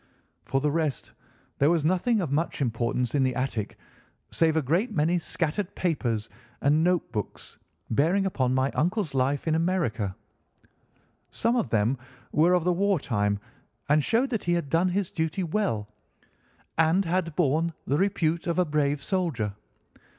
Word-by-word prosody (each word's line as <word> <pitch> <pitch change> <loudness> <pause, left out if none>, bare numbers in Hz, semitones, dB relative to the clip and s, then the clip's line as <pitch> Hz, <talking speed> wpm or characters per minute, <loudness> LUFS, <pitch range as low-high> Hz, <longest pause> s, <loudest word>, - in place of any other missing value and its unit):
For 135 +1 0
the 150 +1 +1
rest, 155 -4 -2 0.5
there 140 - +4
was 165 -3 +2
nothing 190 +6 +2
of 160 -7 -3
much 160 +4 -1
importance 120 -1 -1
in 145 - +2
the 130 -1 +1
attic 125 -5 -3 0.5
save 160 -1 +2
a - - +3
great 175 - +1
many 170 0 +2
scattered 170 +4 -2
papers 120 - -1 0.3
and 150 +3 +3
note 180 0 +1
books 105 -3 -6 0.3
bearing 170 - +2
upon 130 -9 0
my 130 +1 +1
uncle's 175 -1 0
life 135 +3 0
in 160 - +2
America. 160 - 0 1.1
Some 230 +2 0
of 235 - 0
them 115 +4 +1 0.3
were 165 +4 +4
of 180 -2 +3
the 180 +1 +2
war 195 0 +2
time 105 -6 0 0.5
and 150 0 +4
showed 245 - +1
that 225 - -2
he 175 - +2
had 170 -5 -1
done 170 +4 +2
his 190 0 -1
duty 160 +3 -1
well 165 - -1 0.9
and 165 +4 +3
had 165 -2 -1
borne 165 +1 +2
the 145 +3 +1
repute 170 -4 0
of 170 - 0
a 180 - +3
brave 145 -2 0
soldier. 155 - -1
160 Hz, 160 wpm, -27 LUFS, 135-180 Hz, 1.1 s, there